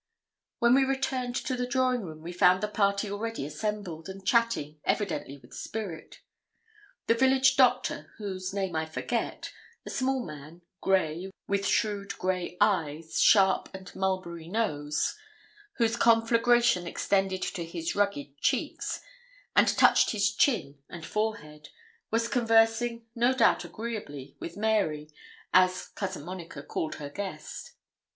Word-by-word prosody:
When 235 0 +4
we 270 +1 +5
returned 265 -2 -1
to 255 - -1
the 250 0 -2
drawing 255 -1 +1
room, 155 -5 -9
we 170 - -6
found 180 +2 +4
the - - +1
party 200 -1 0
already 225 -5 -3
assembled, 185 -1 -4
and 190 0 -9
chatting, 215 -10 +1
evidently 170 -8 -1
with - - -18
spirit. 195 -8 -6 0.8
The - - +4
village 265 +2 +4
doctor, 255 -2 +2
whose 190 -3 -4
name 190 -3 -2
I 160 0 -1
forget, 225 +9 -3 0.3
a - - -6
small 260 -2 0
man, 155 +3 -10 0.2
grey, 185 -1 +1 0.2
with 200 0 0
shrewd 205 -2 0
grey 180 -1 -2
eyes, 160 -5 +1
sharp 190 -3 +5
and 190 -1 -10
mulberry 185 -4 -2
nose, 150 -8 -1 0.6
whose 230 - +1
conflagration 230 -4 +4
extended 190 +1 0
to 175 -3 -3
his 165 0 -4
rugged 145 -9 -1
cheeks, - - -1 0.5
and - - +6
touched - - +4
his 205 -1 +1
chin 215 - +1
and 170 -2 -8
forehead, 155 -9 -3 0.4
was 230 +1 +1
conversing, 230 0 +2
no 240 +2 +2
doubt 235 -3 +4
agreeably, 175 - -6
with 170 - -7
Mary, 195 -9 0 0.4
as 185 0 +3
Cousin 190 -6 -5
Monica 180 -1 -7
called 155 - -3
her 145 -1 -7
guest. 205 - -7
200 Hz, 135 wpm, -28 LUFS, 170-230 Hz, 0.8 s, and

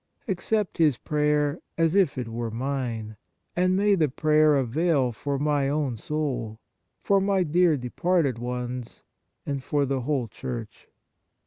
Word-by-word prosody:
Accept 200 0 -1
his 150 -6 +4
prayer 150 0 +1 0.2
as 165 -1 +2
if 190 -9 +3
it 125 -2 -3
were 115 0 -3
mine, 115 -3 -3 0.4
and 185 +1 +2
may 205 +1 +3
the 160 -6 +2
prayer 155 +2 +3
avail 135 +1 +1
for 140 +5 -3
my 145 -1 +1
own 145 -4 -1
soul, 125 -4 -3 0.4
for 200 -1 +3
my 195 -1 +2
dear 170 -1 +3
departed 140 +1 0
ones, 125 0 -5 0.4
and 140 -2 -3
for 145 +1 +1
the 135 -1 -1
whole 130 -2 -1
Church." 115 -1 -7
145 Hz, 140 wpm, -26 LUFS, 125-165 Hz, 0.4 s, his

